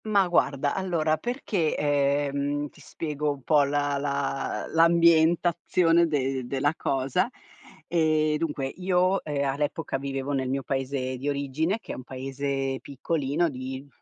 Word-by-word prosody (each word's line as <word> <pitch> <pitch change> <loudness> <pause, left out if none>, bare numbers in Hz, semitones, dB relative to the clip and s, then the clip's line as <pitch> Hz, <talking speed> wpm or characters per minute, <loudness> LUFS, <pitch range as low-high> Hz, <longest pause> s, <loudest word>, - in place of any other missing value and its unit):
Ma 205 -3 +3
guarda, 145 -5 +1
allora 165 -5 0
perché, 205 - -1
ehm, 145 0 0
ti - - -19
spiego 150 -2 -3
un 140 -2 -7
po' 150 +1 +4
la 145 0 0
la 140 -1 -2
l'ambientazione 170 +1 +4
de 135 -4 -1
della 140 +3 +1
cosa. 135 -3 0 0.6
Ehm, 155 -2 +2
dunque 150 -4 -2
io, 185 +4 +1
ehm, 145 -2 -1
all'epoca 145 +1 -2
vivevo 135 0 -3
nel 130 -2 -1
mio 135 +1 -1
paese 130 -1 -2
di 140 +3 -3
origine, 145 +7 -1
che - - -9
è - - -4
un 130 - -8
paese 135 +1 -3
piccolino 145 +3 -1
di 130 0 -6
145 Hz, 135 wpm, -26 LUFS, 135-165 Hz, 0.6 s, po